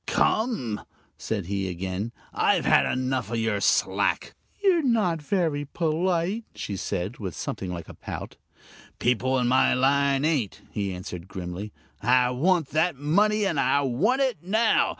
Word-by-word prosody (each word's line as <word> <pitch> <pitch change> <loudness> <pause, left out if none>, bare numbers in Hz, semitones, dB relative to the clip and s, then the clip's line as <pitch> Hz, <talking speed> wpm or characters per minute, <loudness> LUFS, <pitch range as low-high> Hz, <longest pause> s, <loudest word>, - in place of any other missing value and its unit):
"Come!" 215 - +1 0.3
said 100 -5 -3
he, 95 0 -2
again; 95 +5 -4 0.2
"I've - - +2
had - - +4
enough 130 -3 -1
of 115 - -2
your 110 -3 0
slack - - +1
" - - -33
"You're 370 -4 +4
not 215 - +1
very 160 -4 0
polite," 170 +7 0
she 100 - -4
said, 95 +3 -3
with 95 -6 -5
something 95 -2 -4
like 85 -2 -6
a - - -10
pout. - - -7 0.6
"People 125 +2 +1
in 125 -1 +1
my 130 +2 +4
line 140 +1 +2
ain't," 140 - -1
he 100 -2 -2
answered, 90 -1 -7
grimly. 95 +2 -6 0.3
"I 125 +2 +4
want 160 +4 +2
that 160 +2 +1
money! 205 +9 +2
and 170 -7 0
I 135 +2 +3
want 140 - +1
it 260 -4 0
now! 220 +6 +3
130 Hz, 155 wpm, -26 LUFS, -, 0.6 s, had